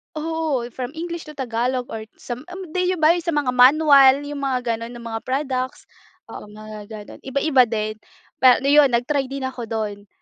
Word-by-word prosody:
Oo. 315 -4 -2
From 255 +5 -6
English 340 0 -6
to 305 - -10
Tagalog 250 0 -2
or 220 -1 -6
sam 250 +6 -8
eh, 360 - -9 0.2
'di 365 +1 0
ba 315 0 +4
yung 345 -1 -1
sa 335 - 0
mga 285 -4 +1
manual, 270 +1 +6
yung 290 0 -6
mga 255 -1 0
gano'n, 230 0 -3
na 235 - -10
mga 225 -1 -4
products. 265 +6 -2 0.5
Oo, - - -9
mga 215 0 -10
gano'n. 215 -2 -10
Iba-iba 270 0 +2
din. 215 -1 -3 0.4
Pa 255 -1 +7
ano - - 0
'yon 295 -1 +7
nag-try 270 +3 0
din 275 0 -6
ako 255 -3 -5
do'n. 210 -2 -4
260 Hz, 190 wpm, -22 LUFS, 230-300 Hz, 0.5 s, Pa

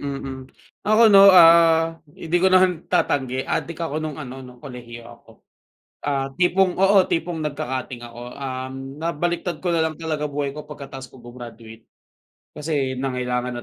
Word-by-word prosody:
mm. 140 -1 -5 0.6
Ako 215 0 +6
'no, 195 0 +9
ah, 165 -2 +6 0.2
hindi 165 - -9
ko 190 - +4
naman 185 -2 +2
tatanggi, 130 -2 0
adik 170 - -3
ako 160 -2 -3
nung 155 -2 -5
ano, 135 -3 -8
nung 125 -1 -12
kolehiyo 120 -3 -10
ako. 120 0 -16 0.7
Ah, 135 -2 -1
tipong 180 0 +2
oo, 195 +2 +4
tipong 165 0 -2
nagka-cutting 130 -5 -4
ako. 120 +1 -10
Um, 135 +1 -6
nabaliktad 170 +1 -3
ko 175 - 0
na 165 - +1
lang 155 - -7
talaga 155 -2 -3
buhay 145 -1 -3
ko 150 +1 -10
pagkatapos 135 -3 -9
ko 125 -1 -17
gumraduate 115 -2 -12 0.6
kasi 145 -4 -3
nangailangan 125 -2 -3
145 Hz, 150 wpm, -22 LUFS, 125-165 Hz, 0.7 s, no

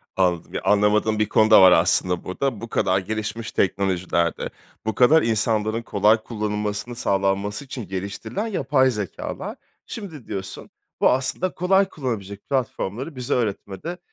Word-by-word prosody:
Anladım. 90 -3 0
Yani, - - -2
anlamadığım 105 +1 +3
bir 105 - +1
konu 110 0 +3
da 110 - +9
var, 95 -1 +9
aslında, 90 +1 +3
burada. 115 +4 -2
Bu 115 - -7
kadar 95 +1 +1
gelişmiş 110 +3 -4
teknolojilerde, 90 -4 0 0.4
bu 110 -2 -1
kadar 155 +6 +6
insanların 110 0 0
kolay 105 +1 +3
kullanılmasının 105 +1 -3
sağlanması 100 +2 0
için 125 -5 -7
geliştirilen 100 - -4
yapay 135 - +2
zekâlar. 105 -6 -5 0.3
Şimdi 170 - -8
diyorsun, 95 -2 -6 0.3
bu, - - +6
aslında, 135 +8 0
kolay 190 +2 +2
kullanılabilecek 100 - -5
platformları 130 - -2
bize 125 +2 -2
öğretmede 115 - -3
110 Hz, 135 wpm, -23 LUFS, 100-130 Hz, 0.4 s, da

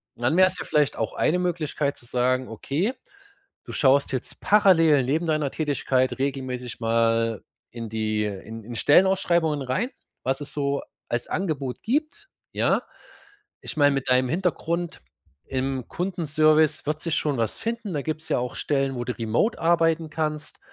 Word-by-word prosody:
Dann 120 +7 0
wäre 185 0 +7
es 185 - -5
ja - - -4
vielleicht 150 -2 +1
auch 110 - -2
eine 175 - +2
Möglichkeit, 155 -5 -1
zu - - -15
sagen, 125 +1 +1
okay, 155 - -2 0.7
du - - -8
schaust 140 -1 +3
jetzt 130 - -5
parallel 165 -9 +5
neben 155 +6 0
deiner 155 -3 0
Tätigkeit 135 -4 0
regelmäßig 130 -3 -3
mal 115 -1 +1 0.3
in 115 -1 -6
die 110 -1 -1
in 110 +2 -6
in 120 +3 -8
Stellenausschreibungen 170 - +3
rein, 135 - -1 0.3
was 135 +2 -1
es 145 - -7
so 140 -1 -1 0.3
als 120 - -2
Angebot 145 -9 -3
gibt, 305 - -2 0.2
ja. - - +2 0.8
Ich - - -7
meine, 145 -1 +5
mit 135 -1 -2
deinem 125 0 +3
Hintergrund 170 0 -1 0.4
im 130 -1 -2
Kundenservice 155 -4 +2
wird 155 +1 -2
sich 165 -2 -1
schon 145 -5 0
was 115 -2 -1
finden. 230 -4 -4
Da 145 - -1
gibt's 155 0 -4
ja - - +2
auch 125 0 -3
Stellen, 135 -2 0
wo 120 - -3
du 125 - -2
remote 115 - 0
arbeiten 165 -1 +2
kannst. 150 -1 -3
145 Hz, 160 wpm, -25 LUFS, 125-165 Hz, 0.8 s, wäre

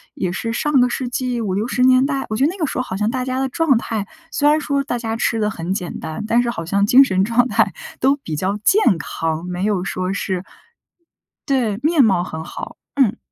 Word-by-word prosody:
也 180 - -2
是 230 +5 -3
上 270 +2 +2
个 250 - +3
世 250 +1 -3
纪 250 0 -2
五 205 -5 -2
六 210 +5 -1
十 250 - -1
年 255 +1 +5
代， 275 -2 -2
我 215 - -2
觉 260 - +1
得 305 - +3
那 380 - -9
个 335 - 0
时 - - -4
候 255 - +1
好 190 -6 -5
像 210 +2 0
大 255 +1 -2
家 255 0 -2
的 270 - 0
状 295 -2 +2
态 220 -3 -3 0.2
虽 295 -1 +3
然 305 - +4
说 280 -2 -1
大 245 -3 -2
家 225 -1 -3
吃 225 0 0
得 210 -1 +1
很 175 -2 -3
简 180 -3 -4
单， 160 +7 -5
但 235 +2 +3
是 240 - -1
好 170 -8 -4
像 200 +4 +1
精 255 +6 +7
神 190 -7 +1
状 235 +4 +2
态 - - +1 0.3
都 270 +2 +4
比 165 - -6
较 190 +7 -1
健 385 - +4
康， 160 +1 -3
没 180 +1 -4
有 205 -4 0
说 185 0 -2
是 190 -2 -2 1.0
对， 245 -7 0
面 310 -1 +4
貌 190 -6 +3
很 160 -2 -6
好， - - -8 0.2
嗯。 260 -7 +2
230 Hz, 260 characters per minute, -20 LUFS, 190-265 Hz, 1.0 s, 精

